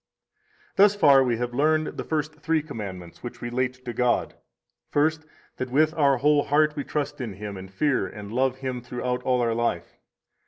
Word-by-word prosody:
103 195 - +7
Thus 205 0 +5
far 140 -5 +7
we 120 -3 0
have 120 +1 -3
learned 155 +4 +1
the - - -4
first 155 -1 -2
three 160 0 0
commandments, 95 - -8
which 120 - -7
relate 130 +1 -3
to 120 - -4
God. 125 +1 +1 0.6
First, 155 +2 +1 0.3
that 130 - -3
with 155 +5 +3
our 140 -4 +3
whole 145 +2 +3
heart 150 +1 +3
we 145 - -3
trust 145 -1 -3
in 115 -5 -4
Him, 100 +1 -7
and 95 0 -9
fear 140 +7 +1
and 105 -1 -9
love 130 +1 +1
Him 130 -2 -4
throughout 125 +1 -3
all 125 -1 +1
our 115 -1 +1
life. 115 -7 -2
130 Hz, 190 wpm, -25 LUFS, 120-150 Hz, 0.6 s, 103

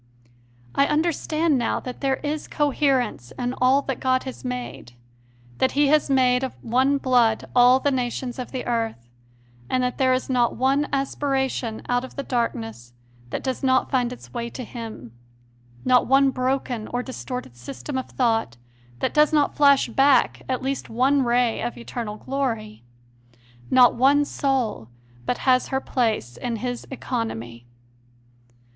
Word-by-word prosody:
I 280 - +3
understand 310 -1 +1
now 235 - 0
that 250 -1 -8
there 270 -1 +2
is 300 +1 -3
cohe 295 -1 -1 0.2
rence 210 - -4
in 245 0 -2
all 265 +3 +4
that 270 -3 -3
God 255 0 +1
has 260 - -8
made 250 - -6 0.7
that 260 - +2
He 285 0 +3
has 300 -1 +3
made 255 -1 +3
of 265 - -4
one 260 +4 +2
blood 245 -5 +2
all 250 +1 +6
the 285 - +1
nations 250 0 -3
of 250 - -6
the 260 - -4
earth; 225 - -3 0.6
that 250 -1 0
there 260 -1 +3
is 255 0 0
not 245 -3 +1
one 270 +4 +1
aspiration 265 -4 -1
out 245 0 +1
of 260 - -10
the 280 - -3
dark 240 -3 0
ness 115 +2 -9 0.4
that - - -4
does 260 -1 -2
not 260 -1 +2
find 245 -2 +1
its 250 - -11
way 235 -1 -3
to 255 - -7
Him; 220 - -8 0.7
not 255 -1 +4
one 270 +1 +4
broken 255 -3 -2
or 245 +1 -3
distorted 250 - -6
system 120 - -7
of 260 - -3
thought 225 - 0 0.4
that - - 0
does 300 +1 +4
not 295 -2 +2
flash 280 -2 +5
back 270 +2 +3
at 255 -1 -1
least 270 +1 -3
one 260 +5 +2
ray 240 -1 +1
of 240 - -4
eternal 235 -3 -5
glory; 225 - -3 0.9
not 250 -1 +6
one 280 +4 +4
soul 250 - -1 0.4
but 245 - 0
has 255 -1 +4
her 265 - -1
place 220 - -1
in 240 -2 -3
His 245 +1 -4
economy. 120 - -5
255 Hz, 160 wpm, -23 LUFS, 235-270 Hz, 0.9 s, all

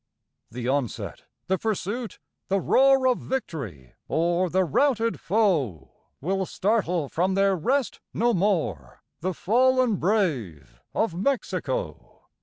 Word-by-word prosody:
The 120 +1 -5
onset 135 -4 -2 0.2
the 190 0 0
pursuit 220 +2 -3 0.3
the 195 +1 +1
roar 270 +5 +4
Of 255 - +2
victory 130 - -5 0.2
o'er 175 +2 +1
the 185 +2 +2
routed 230 - +1
foe 155 - 0 0.3
Will 190 +4 -1
startle 180 -7 0
from 185 +6 0
their 195 0 +3
rest 255 - 0
no 240 +1 +1
more 170 - -1 0.2
The 185 +1 -2
fallen 250 +2 +3
brave 120 - -1
of 220 -6 +1
Mexico. 280 - -2
190 Hz, 115 wpm, -25 LUFS, 155-230 Hz, 0.3 s, roar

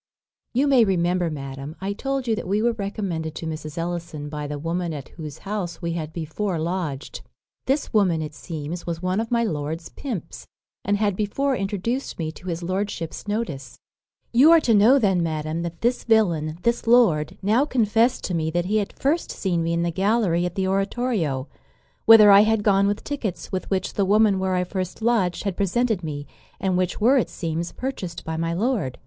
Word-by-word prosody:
"You 260 +4 +2
may 270 -4 +5
remember, 180 -3 +1
madam, 135 0 -6
I 195 +1 -2
told 270 +4 -2
you 225 - +2
that 210 - -5
we 200 +3 +1
were 235 +2 +2
recommended 195 -7 -4
to - - -6
Mrs. 155 0 -6
Ellison 170 -3 -4
by 150 -1 -5
the 145 0 -4
woman 165 +2 -2
at 140 -3 -7
whose 155 -4 -8
house 195 -5 -3
we 170 - -3
had 160 -2 -4
before 170 +4 -3
lodged. 160 -4 -3 0.5
This 275 +1 0
woman, 190 -7 +3
it 155 -1 -5
seems, 160 +2 -6
was 170 0 -4
one 185 +2 0
of 225 0 -2
my 235 -1 +2
lord's 160 -3 -3
pimps, 210 - -6 0.4
and 205 +1 +1
had 205 -2 +1
before 265 +7 0
introduced 210 +6 -2
me 160 -2 -3
to 180 - -13
his 170 0 -3
lordship's 185 -1 -3
notice. 155 - -3 0.6
"You 265 +7 +7
are 335 0 +8
to 235 - +2
know 220 +6 +6
then, 195 -8 +2
madam, 155 0 -2
that 170 -1 -6
this 240 +2 +1
villain, 170 -9 +2
this 235 0 0
lord, 195 -8 +4
now 220 +7 +3
confest 230 -2 +2
to 185 - -3
me 160 -2 0
that 175 +2 -1
he 210 +4 +1
had 205 -2 -2
first 300 +5 0
seen 175 -4 -1
me 165 0 -1
in 170 0 +1
the 170 - 0
gallery 190 -2 +1
at 175 - -8
the 190 -1 0
oratorio, 195 - -1 0.6
whither 215 -2 +9
I 200 0 +9
had 220 0 +2
gone 200 -1 +4
with 205 +1 -1
tickets 240 -11 -4
with 185 -1 -3
which 190 -1 -1
the 200 - +1
woman 205 0 +4
where 190 -1 0
I 180 - +1
first 185 +3 -5
lodged 220 -7 +1
had 200 -3 -2
presented 210 0 0
me, 145 -2 -5 0.3
and 190 -2 0
which 185 0 0
were, 255 +5 +5
it - - -1
seems, 165 0 -3
purchased 250 -10 -5
by 160 - -3
my 165 +1 -1
lord. 195 - -1
185 Hz, 200 wpm, -23 LUFS, 165-220 Hz, 0.6 s, whither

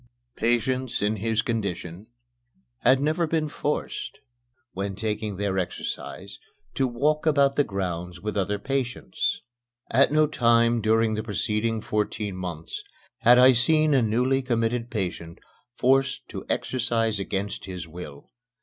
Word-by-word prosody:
Patients 125 +2 0
in 105 +1 +1
his 110 +1 0
condition 100 -4 -3 0.7
had 130 +2 +4
never 155 +4 +1
been 155 -1 0
forced, 150 0 -3 0.5
when 100 +1 -4
taking 105 0 -3
their 100 -1 0
exercise, 100 +2 -5 0.3
to 135 - +1
walk 150 +6 0
about 140 -2 +4
the 145 - +4
grounds 90 -4 -4
with 105 +3 -3
the 100 - +1
other 105 +2 -1
patients. 130 +2 -2 0.5
At 140 +5 +4
no 155 0 +4
time 115 -4 +3
during 110 +1 +3
the 110 - -1
preceding 110 +1 -1
fourteen 105 -2 -2
months 85 -3 -6 0.4
had 120 +1 +6
I 130 +1 +8
seen 155 +5 +3
a 135 - +4
newly 125 +4 +2
committed 120 -1 -1
patient 90 -6 -4 0.4
forced 135 +1 +2
to - - -7
exercise 115 -4 0
against 100 +1 -3
his 90 -3 -6
will. 80 -4 -10
115 Hz, 135 wpm, -25 LUFS, 100-130 Hz, 0.7 s, I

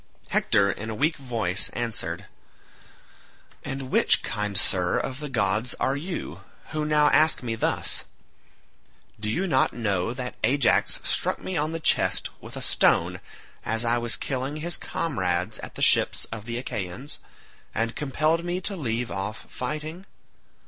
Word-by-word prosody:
Hector 100 0 +3
in 110 +2 -6
a 110 - -3
weak 155 +7 +1
voice 115 -8 -1
answered, 120 -2 -2 1.4
"And 135 -1 -5
which, - - +4
kind 105 -2 -1
sir, 90 -2 +4
of 130 0 -3
the 150 -1 -5
gods 110 0 +1
are 135 - +1
you, 170 +5 -5 0.3
who 155 -1 -1
now 150 -1 +4
ask 155 -3 +5
me 115 -2 -2
thus? 115 - -1 1.2
Do 105 0 -3
you 180 - 0
not 135 -8 +3
know 100 -4 0
that 125 0 -5
Ajax 140 -1 +3
struck - - +1
me 185 - -5
on 155 0 0
the 165 - -3
chest - - +2
with - - -9
a - - -3
stone - - +3 0.4
as 115 +2 0
I 120 +1 +3
was 120 -1 +1
killing 135 0 -3
his 170 +3 -1
comrades 95 - -1
at - - -9
the - - -2
ships - - +4
of 110 -2 -6
the 115 0 -3
Achaeans, 120 +1 -4 0.6
and 115 +1 -1
compelled 155 +3 +1
me 175 +1 -1
to 195 +2 0
leave 120 -6 -2
off 100 +3 -4
fighting? 155 +7 -5
125 Hz, 155 wpm, -26 LUFS, 110-150 Hz, 1.4 s, ask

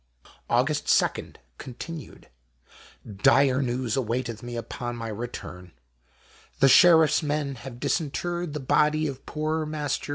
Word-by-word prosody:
Aug. 125 +3 +3
2 150 -2 0 0.2
continued. 150 +4 -9 0.5
— 100 -3 -15
Dire 135 -1 +3
news 125 -2 -1
awaiteth 120 -2 -2
me 120 0 -7
upon 120 +1 -5
my 115 -1 -6
return. 100 -5 -7 0.9
The 135 - +6
Sheriff's 160 -1 +6
men 145 -2 -2
have 120 -1 -10
disinterred 175 +3 -2
the 150 - -3
body 150 +3 +2
of 135 -3 -6
poor 155 +1 -2
Master 150 -2 -3
W. - - -12
135 Hz, 130 wpm, -26 LUFS, 120-155 Hz, 0.9 s, The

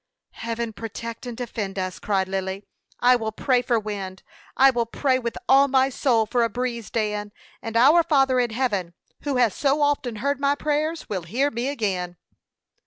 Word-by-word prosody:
"Heaven 230 0 -4
protect 230 +2 -7
and 240 -2 -6
defend 215 -5 -4
us!" 185 -2 -3
cried 195 -2 0
Lily. 190 +1 -3 0.4
"I 250 +1 +6
will 220 -2 -2
pray 250 +3 +1
for 240 -2 +1
wind; 200 -3 -6 0.3
I 270 +1 +7
will 235 -2 -1
pray 260 +2 +1
with 235 -2 -4
all 275 +1 +6
my 265 0 +3
soul 245 -4 +2
for 240 +2 +1
a 230 - +1
breeze, 235 -1 -3
Dan, 210 -2 -2 0.3
and 225 0 -3
our 290 +8 +7
Father 270 -6 +3
in 245 -1 +1
heaven, 210 -8 -2 0.3
who 285 -2 0
has 235 -5 +3
so 280 +1 +1
often 280 -5 0
heard 280 +5 -1
my 280 0 +2
prayers 305 +2 -1
will 190 -3 -3
hear 250 - 0
me 235 +3 -2
again." 190 -10 -2
235 Hz, 180 wpm, -24 LUFS, 210-265 Hz, 0.4 s, I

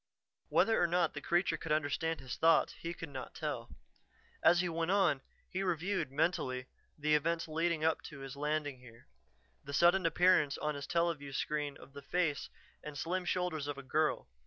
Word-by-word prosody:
Whether 225 -3 +3
or 175 - +4
not 170 -1 +1
the - - -6
creature 175 +2 +1
could 160 - -6
understand 155 +1 0
his 130 -2 -5
thoughts, 165 -1 +4
he 170 - -6
could 165 -1 -7
not 135 -2 -7
tell. - - -4 0.7
As 175 - +6
he 180 - 0
went 165 0 -1
on, 190 -8 +3 0.3
he 185 - -3
reviewed, 180 -3 -1
mentally, 135 -4 0 0.3
the 150 0 +1
events 165 +3 +1
leading 165 0 0
up 160 - +2
to 140 -3 -9
his 135 0 -7
landing 145 -2 -2
here. 120 -2 -15 0.6
The 140 - -7
sudden 175 +3 +5
appearance 175 -4 +4
on 150 0 -1
his 140 -1 -6
teleview 170 -5 0
screen 150 -2 -2
of 135 - -15
the 140 - -8
face 160 -1 -1 0.3
and 150 -1 -7
slim 180 +5 -2
shoulders 175 -5 -1
of 145 -1 -3
a 140 - -7
girl. 155 +4 0
155 Hz, 180 wpm, -34 LUFS, 145-175 Hz, 0.7 s, As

